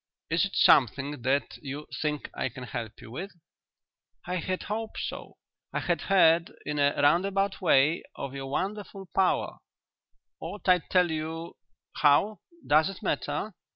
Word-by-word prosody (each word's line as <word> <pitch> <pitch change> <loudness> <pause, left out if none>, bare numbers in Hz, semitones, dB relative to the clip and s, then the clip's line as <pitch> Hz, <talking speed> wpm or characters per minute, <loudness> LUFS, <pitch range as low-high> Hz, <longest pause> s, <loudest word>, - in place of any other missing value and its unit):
"Is 165 +3 +3
it 195 - -6
something 135 +2 +4
that 135 +3 0
you 145 +1 -6 0.2
think 150 -1 -2
I - - -2
can 125 +1 -9
help 115 -3 -5
you 110 - -11
with?" 175 +7 -7 0.9
"I 180 +1 -2
had 185 +2 -3
hoped 220 +1 -4
so. - - -6 0.4
I - - 0
had - - 0
heard 170 -3 +4
in 150 0 -2
a 145 0 +3
roundabout 190 +7 +2
way 155 -2 +4
of 135 - -6
your 135 -1 -5
wonderful 195 +5 -4
power 190 -1 +1 0.8
ought 205 -3 -7
I 180 -1 +6
to - - -22
tell 180 -2 +3
you 160 +1 -4 0.4
how 155 +9 +4 0.3
does 155 +4 +4
it 195 - -9
matter?" 215 - -2
165 Hz, 155 wpm, -28 LUFS, 145-190 Hz, 0.9 s, I